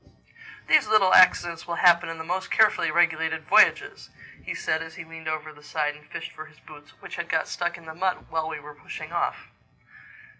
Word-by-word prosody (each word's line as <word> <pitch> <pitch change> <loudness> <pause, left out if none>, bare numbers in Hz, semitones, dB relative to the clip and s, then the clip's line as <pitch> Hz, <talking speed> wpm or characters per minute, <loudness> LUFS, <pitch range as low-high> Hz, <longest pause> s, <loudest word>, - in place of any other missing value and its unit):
"These - - +4
little 195 -4 +4
accidents 175 -2 +4
will 170 - -3
happen 170 -1 +4
in 165 - -6
the 160 - -6
most 180 +3 -3
carefully 220 -1 +3
regulated 165 -2 +1
voyages," - - +3 0.3
he - - -5
said 160 0 -1
as 165 0 -9
he 180 - -8
leaned 160 0 -11
over 155 0 -4
the 145 - -18
side 150 0 -2
and 150 0 -19
fished - - -7
for 155 - -10
his 155 -1 -21
boots 145 -1 -15
which - - -9
had 170 0 -5
got 160 -1 0
stuck 175 -1 -3
in 170 - -16
the 160 - -8
mud 185 +2 -2
while 160 -1 -2
we 160 - -6
were 150 0 -12
pushing 145 - -9
off. - - -3
160 Hz, 210 wpm, -25 LUFS, 155-175 Hz, 0.3 s, These